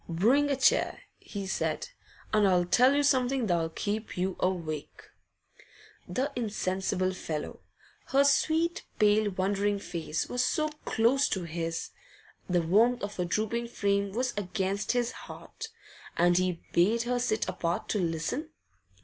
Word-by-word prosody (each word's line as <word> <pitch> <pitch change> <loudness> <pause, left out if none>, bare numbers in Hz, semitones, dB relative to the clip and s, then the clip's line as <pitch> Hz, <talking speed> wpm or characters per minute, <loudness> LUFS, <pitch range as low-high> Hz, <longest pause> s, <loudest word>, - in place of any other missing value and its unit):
'Bring 240 +13 +3
a 280 - +2
chair,' 260 - +2 0.2
he 200 -2 -6
said, 190 - -2 0.4
'and 210 -2 +5
I'll 180 -2 +3
tell 250 +9 +5
you 290 - +3
something 260 -2 +2
that'll 170 -4 +1
keep 210 +6 -4
you 185 +1 -1
awake.' 165 -5 -3 1.0
The 260 +11 -1
insensible 190 -4 -1
fellow! 155 -4 -5 0.5
Her 275 +1 +4
sweet, 320 +4 +2
pale, 210 0 +4
wondering 200 +2 0
face 165 -5 -3
was 245 0 0
so 310 0 +1 0.2
close 255 +5 +3
to 190 - -1
his, 165 0 -4 0.6
the 175 -1 +2
warmth 220 +9 +3
of 205 0 -4
her 180 - 0
drooping 220 +6 -1
frame 200 -3 0
was 250 +4 -1
against 200 +1 -1
his 245 -1 0
heart - - -9 0.5
and 175 +1 +4
he 180 -1 0
bade 215 +7 +3
her 245 +1 0
sit 230 -3 0
apart 170 0 -2
to 210 - +1
listen. 170 - -2
205 Hz, 140 wpm, -29 LUFS, 180-245 Hz, 1.0 s, and